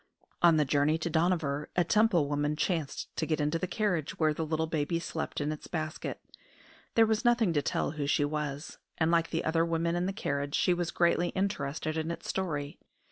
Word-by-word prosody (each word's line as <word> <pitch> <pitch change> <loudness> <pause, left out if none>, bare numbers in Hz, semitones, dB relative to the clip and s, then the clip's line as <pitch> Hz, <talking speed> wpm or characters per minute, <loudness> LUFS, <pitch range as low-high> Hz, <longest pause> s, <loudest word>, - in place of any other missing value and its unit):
On 170 -2 +6
the 150 - +3
journey 145 +3 +2
to 165 +1 -3
Dohnavur 160 -3 +1
a 175 - +4
Temple 180 -3 +3
woman 145 +1 0
chanced 160 -2 -2
to 160 - -1
get 155 -1 0
into 150 +3 0
the 185 - -2
carriage 180 -8 -1
where 155 -2 +2
the 160 - -3
little 160 0 0
baby 160 +1 -1
slept 165 -1 -4
in 145 +1 -1
its 155 - -7
basket. 155 -1 -4 0.8
There 225 - +6
was 220 +2 0
nothing 240 -7 +3
to 145 - +2
tell 140 - -1
who 145 -2 -3
she 145 0 +2
was; 150 0 -4 0.2
and 160 0 +2
like 165 -1 +2
the 165 - -2
other 165 +1 +2
women 170 0 0
in 175 +1 0
the - - 0
carriage, 140 -7 -2
she 180 - +3
was 175 -1 -1
greatly 170 0 +2
interested 155 -5 -2
in 160 +1 -3
its 170 - -5
story. 150 -6 -3
160 Hz, 205 wpm, -30 LUFS, 150-175 Hz, 0.8 s, On